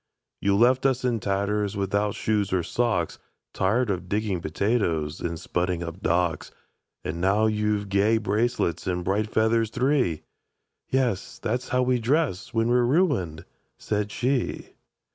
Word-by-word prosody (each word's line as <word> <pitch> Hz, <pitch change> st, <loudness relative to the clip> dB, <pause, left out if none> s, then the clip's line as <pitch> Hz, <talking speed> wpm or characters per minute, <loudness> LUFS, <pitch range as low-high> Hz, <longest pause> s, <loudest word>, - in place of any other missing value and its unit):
—"You 100 Hz, 0 st, +2 dB
left 125 Hz, +5 st, +4 dB
us 130 Hz, -1 st, 0 dB
in 120 Hz, -2 st, +1 dB
tatters, 100 Hz, +1 st, -1 dB
without 100 Hz, +1 st, 0 dB
shoes 105 Hz, -3 st, 0 dB
or 90 Hz, -2 st, +1 dB
socks, 100 Hz, -4 st, -1 dB, 0.3 s
Tired 105 Hz, +4 st, +1 dB
of 90 Hz, -1 st, -4 dB
digging 105 Hz, -3 st, -1 dB
potatoes, 85 Hz, -4 st, 0 dB
and 85 Hz, -1 st, -3 dB
spudding 90 Hz, +1 st, -2 dB
up 85 Hz, +3 st, -8 dB
docks; 85 Hz, -2 st, 0 dB, 0.5 s
And 85 Hz, +2 st, -4 dB
now 100 Hz, +4 st, +3 dB
you've 105 Hz, -1 st, 0 dB
gay 100 Hz, +3 st, +3 dB
bracelets 110 Hz, -5 st, 0 dB
and 90 Hz, -1 st, -1 dB
bright 105 Hz, +3 st, 0 dB
feathers 110 Hz, 0 st, +2 dB
three!"— 125 Hz, -, +1 dB, 0.7 s
"Yes: 130 Hz, -7 st, 0 dB
that's 125 Hz, +3 st, -3 dB
how 125 Hz, 0 st, +2 dB
we 125 Hz, 0 st, +2 dB
dress 125 Hz, -, 0 dB
when 115 Hz, 0 st, +1 dB
we're 125 Hz, 0 st, +4 dB
ruined," 120 Hz, -, +1 dB, 0.3 s
said 105 Hz, -1 st, -2 dB
she. 125 Hz, 0 st, -1 dB
105 Hz, 145 wpm, -25 LUFS, 90-120 Hz, 0.7 s, left